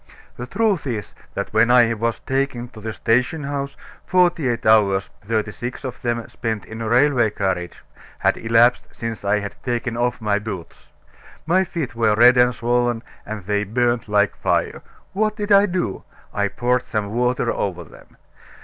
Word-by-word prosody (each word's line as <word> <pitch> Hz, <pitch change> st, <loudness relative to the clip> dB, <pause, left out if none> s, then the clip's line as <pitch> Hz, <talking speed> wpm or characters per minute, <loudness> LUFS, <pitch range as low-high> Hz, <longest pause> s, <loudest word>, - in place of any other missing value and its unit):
The 125 Hz, -, -7 dB
truth 200 Hz, -, 0 dB
is, 110 Hz, -5 st, -4 dB, 0.2 s
that -, -, -4 dB
when 110 Hz, +2 st, +4 dB
I 120 Hz, -2 st, +5 dB
was 115 Hz, +1 st, -2 dB
taken 130 Hz, -3 st, -2 dB
to 110 Hz, -, -13 dB
the 110 Hz, +1 st, -4 dB
station 125 Hz, +8 st, 0 dB
house, 140 Hz, 0 st, -4 dB, 0.3 s
forty 175 Hz, -5 st, +2 dB
eight 120 Hz, -2 st, -2 dB
hours 100 Hz, -3 st, +3 dB
thirty 110 Hz, 0 st, -1 dB
six 120 Hz, +5 st, -6 dB
of 130 Hz, -2 st, -6 dB
them 120 Hz, -1 st, -2 dB
spent 110 Hz, -3 st, -4 dB
in 110 Hz, +1 st, -8 dB
a 110 Hz, -, -2 dB
railway 125 Hz, -1 st, +4 dB
carriage 95 Hz, -4 st, -3 dB, 0.3 s
had -, -, +2 dB
elapsed 115 Hz, +2 st, +3 dB
since 115 Hz, -2 st, -6 dB
I 100 Hz, +1 st, +2 dB
had 100 Hz, -1 st, -4 dB
taken 120 Hz, -1 st, -2 dB
off 120 Hz, +1 st, 0 dB
my 105 Hz, -2 st, 0 dB
boots. 100 Hz, -5 st, -8 dB, 0.5 s
My 185 Hz, +4 st, +3 dB
feet 165 Hz, -9 st, -4 dB
were 110 Hz, -2 st, +2 dB
red 120 Hz, +3 st, +7 dB
and 125 Hz, 0 st, +4 dB
swollen, 120 Hz, 0 st, 0 dB, 0.2 s
and 105 Hz, -3 st, -6 dB
they 105 Hz, +1 st, 0 dB
burned 120 Hz, +3 st, 0 dB
like 105 Hz, -1 st, +2 dB
fire. -, -, -1 dB, 0.3 s
What 215 Hz, +2 st, 0 dB
did 210 Hz, -1 st, -4 dB
I 200 Hz, +1 st, +6 dB
do? 175 Hz, -, -2 dB, 0.3 s
I 100 Hz, 0 st, +1 dB
poured 125 Hz, +4 st, 0 dB
some 105 Hz, -4 st, -3 dB
water 125 Hz, 0 st, +1 dB
over 90 Hz, -3 st, -3 dB
them. 75 Hz, -, -18 dB
120 Hz, 175 wpm, -21 LUFS, 105-125 Hz, 0.5 s, red